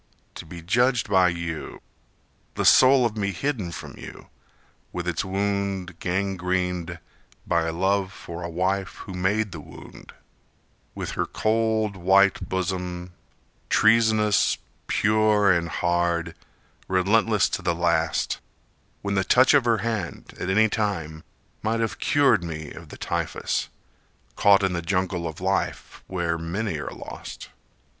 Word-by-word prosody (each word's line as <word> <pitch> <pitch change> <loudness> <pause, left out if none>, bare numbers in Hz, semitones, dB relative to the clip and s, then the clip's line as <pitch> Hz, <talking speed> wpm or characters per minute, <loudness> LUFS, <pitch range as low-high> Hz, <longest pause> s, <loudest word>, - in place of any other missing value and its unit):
To - - -9
be 85 0 -9
judged 120 +3 +2
by 95 -2 +5
you, 85 -2 -5 0.8
The - - -1
soul 130 -1 +7
of 115 -2 -1
me 100 -2 -1
hidden 105 -3 -2
from - - -9
you, - - -11 0.6
With 90 -1 -4
its 85 -3 -1
wound 95 -2 -2
gangrened 90 -2 -1 0.5
By 85 -1 +1
love 95 +3 0
for 85 -2 -8
a 85 - -4
wife 95 +3 -1
who 95 - -8
made 100 +3 0
the 80 - -7
wound, - - -13 0.8
With - - -4
her - - -2
cold 110 -1 0
white 95 +2 +3
bosom, 90 -1 -3 0.6
treasonous, 110 -2 +4 0.3
pure 105 -1 +3
and 85 -2 +1
hard, 85 -1 0 0.5
Relentless 100 +2 +3
to - - -3
the 85 - 0
last, 85 -2 0 0.6
when 100 0 -1
the 95 -1 +2
touch 130 +7 +5
of 140 -4 +4
her 115 -4 +2
hand, 105 -10 -4
At 90 - -3
any 110 +3 +4
time, 85 -8 -2 0.4
might 115 +1 0
have 115 -1 -2
cured 135 -9 +3
me 80 -3 -6
of - - -11
the - - -10
typhus, - - -2 0.7
Caught 100 -1 +5
in 95 -1 +1
the 85 - -2
jungle 90 -1 -1
of 80 -1 -7
life 95 +2 -2
where 85 -3 -1
many 85 +1 -3
are 75 - -4
lost. - - -9
95 Hz, 135 wpm, -25 LUFS, 85-105 Hz, 0.8 s, soul